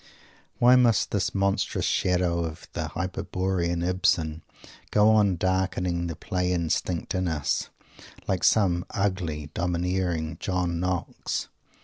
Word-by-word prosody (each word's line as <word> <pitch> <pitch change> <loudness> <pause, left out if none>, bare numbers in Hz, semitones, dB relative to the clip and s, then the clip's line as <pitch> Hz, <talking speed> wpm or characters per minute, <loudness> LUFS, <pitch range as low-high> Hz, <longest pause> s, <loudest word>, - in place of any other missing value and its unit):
Why 125 +1 +6
must 120 -4 +3
this 100 -2 -1
monstrous 100 0 0
shadow 90 -2 +1
of 80 -1 -6
the - - -2
Hyperborean 90 -1 -1
Ibsen 80 -3 +1 0.5
go 105 +1 +5
on 105 -4 +4
darkening 90 -1 0
the 85 - -4
play 90 +3 -2
instinct 85 0 -1
in 95 -1 0
us, 75 -4 -1 0.6
like 95 -2 0
some 90 -5 +3
ugly, 90 -7 -2
domineering 85 -2 -1
John 90 -3 -1
Knox? 90 -1 -2
90 Hz, 115 wpm, -26 LUFS, 85-95 Hz, 0.6 s, Why